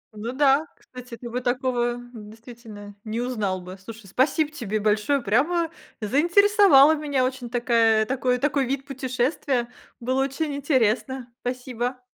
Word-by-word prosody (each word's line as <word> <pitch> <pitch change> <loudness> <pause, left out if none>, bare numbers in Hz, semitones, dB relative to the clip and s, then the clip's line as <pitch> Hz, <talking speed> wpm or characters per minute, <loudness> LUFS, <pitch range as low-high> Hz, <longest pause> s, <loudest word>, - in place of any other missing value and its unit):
Ну 225 +3 -5
да, 280 +3 +3
кстати, 250 -2 -11
ты 240 - -9
бы 245 +2 -3
такого, 245 -1 0 0.2
действительно, 220 -1 -11
не 220 +1 -4
узнал 215 -7 -2
бы. 180 +1 -10
Слушай, 225 +1 -10
спасибо 290 - +1
тебе 215 -7 -3
большое, 215 +7 +1
прямо 320 - +1 0.3
заинтересовала 335 - +5
меня. 285 -4 0
Очень 255 -2 -4
такая 230 -2 +2
такой 250 0 0
такой 275 0 0
вид 270 0 -3
путешествия, 260 -1 -2 0.3
было 255 +2 0
очень 280 +2 -2
интересно, 260 -2 0
спасибо. 250 0 -4
250 Hz, 135 wpm, -24 LUFS, 230-275 Hz, 0.3 s, заинтересовала